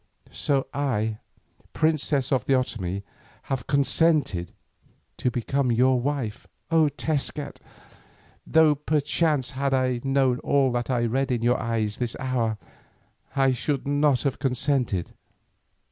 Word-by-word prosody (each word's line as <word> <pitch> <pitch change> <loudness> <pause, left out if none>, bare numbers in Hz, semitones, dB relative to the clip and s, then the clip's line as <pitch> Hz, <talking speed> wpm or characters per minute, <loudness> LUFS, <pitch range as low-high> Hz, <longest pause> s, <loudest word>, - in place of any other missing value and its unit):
So 140 -2 0
I, 110 -6 -1 0.5
princess 150 -4 +1
of 130 -2 +1
the 135 - +2
Otomie, 100 -7 -2 0.5
have 125 -4 -3
consented 140 - +2 0.7
to 125 - 0
become 125 +2 0
your 125 +2 +3
wife, 135 -5 -3 0.2
O 160 -2 +4
Tezcat, 145 -1 -3 0.9
though 160 -1 +5
perchance 150 -1 0
had 135 +1 0
I 130 -2 0
known 135 -2 +2
all 135 -2 +2
that 120 0 -2
I 120 -2 +1
read 135 +3 0
in 120 -2 -1
your 120 +1 +2
eyes 110 -2 -2
this 120 -2 -2
hour, 120 -4 -1 0.8
I 135 -1 +3
should 135 +2 -2
not 145 -3 +2
have 140 -3 -1
consented. 125 - 0
130 Hz, 125 wpm, -25 LUFS, 120-145 Hz, 0.9 s, though